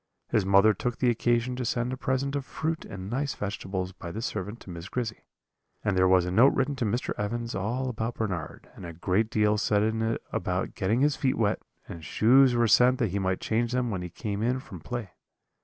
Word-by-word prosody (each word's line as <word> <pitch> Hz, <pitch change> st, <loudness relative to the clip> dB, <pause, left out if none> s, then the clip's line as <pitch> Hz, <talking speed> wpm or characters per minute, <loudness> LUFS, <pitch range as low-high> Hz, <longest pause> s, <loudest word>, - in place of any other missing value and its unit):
His 100 Hz, -4 st, +1 dB
mother 100 Hz, +2 st, +6 dB
took 120 Hz, +5 st, -3 dB
the 125 Hz, -2 st, +3 dB
occasion 120 Hz, +1 st, +1 dB
to 130 Hz, -, -2 dB
send 120 Hz, +1 st, -1 dB
a -, -, -1 dB
present 130 Hz, +2 st, -1 dB
of 140 Hz, -, -1 dB
fruit 160 Hz, +4 st, -3 dB
and 95 Hz, -1 st, -7 dB
nice 135 Hz, +6 st, -2 dB
vegetables 95 Hz, -2 st, -4 dB
by 85 Hz, -2 st, -8 dB
this 110 Hz, +6 st, -4 dB
servant 105 Hz, +5 st, -4 dB
to 95 Hz, -, -10 dB
Miss 85 Hz, +2 st, -8 dB
Grizzy; 115 Hz, -3 st, -4 dB, 0.6 s
and 100 Hz, -, +1 dB
there 95 Hz, 0 st, +4 dB
was 95 Hz, -1 st, +4 dB
a 90 Hz, -, -2 dB
note 120 Hz, +9 st, +5 dB
written 135 Hz, +1 st, 0 dB
to 120 Hz, -, -1 dB
Mr. 115 Hz, +4 st, -1 dB
Evans 115 Hz, +3 st, -2 dB
all 120 Hz, +7 st, -2 dB
about 115 Hz, -1 st, -3 dB
Bernard, 90 Hz, -8 st, -4 dB
and -, -, -12 dB
a 85 Hz, -1 st, -7 dB
great 95 Hz, +6 st, 0 dB
deal 105 Hz, -1 st, +2 dB
said 105 Hz, -1 st, +2 dB
in 110 Hz, +1 st, 0 dB
it 115 Hz, 0 st, -1 dB
about -, -, -2 dB
getting 110 Hz, +7 st, 0 dB
his 145 Hz, 0 st, +3 dB
feet 130 Hz, -2 st, 0 dB
wet; 105 Hz, -3 st, +1 dB, 0.3 s
and 80 Hz, -, -8 dB
shoes 125 Hz, -, +5 dB
were 120 Hz, -1 st, +3 dB
sent 125 Hz, +3 st, +5 dB
that 115 Hz, -7 st, 0 dB
he 100 Hz, -, -1 dB
might 95 Hz, -1 st, -1 dB
change 115 Hz, +2 st, 0 dB
them 125 Hz, -2 st, 0 dB
when 95 Hz, -3 st, -3 dB
he 90 Hz, -, -5 dB
came 100 Hz, +3 st, -4 dB
in 125 Hz, +3 st, +1 dB
from 95 Hz, -8 st, -10 dB
play. 115 Hz, +2 st, -5 dB
110 Hz, 225 wpm, -27 LUFS, 95-125 Hz, 0.6 s, mother